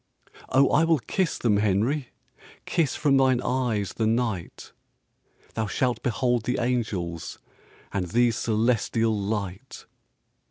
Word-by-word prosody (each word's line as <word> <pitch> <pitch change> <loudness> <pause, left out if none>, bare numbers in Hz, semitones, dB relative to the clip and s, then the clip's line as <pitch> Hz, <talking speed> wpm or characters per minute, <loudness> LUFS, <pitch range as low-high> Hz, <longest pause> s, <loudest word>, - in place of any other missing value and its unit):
"Oh, 135 +1 +4
I 155 - +4
will 165 -1 +3
kiss 165 - -1
them, 110 -4 +2
Henry, 110 +7 +1 0.6
Kiss 160 -6 0
from 140 -2 +3
thine 130 -2 +3
eyes 120 -7 -1
the 110 - 0
night. 115 -6 -2 0.8
Thou 110 -1 -2
shalt 125 +4 -1
behold 120 -1 0
the 125 - 0
angels 105 -9 -2 0.6
And 95 -2 -1
the 120 +5 +3
celestial 115 0 +1
light." 100 +2 -4
115 Hz, 120 wpm, -25 LUFS, 105-130 Hz, 0.8 s, Oh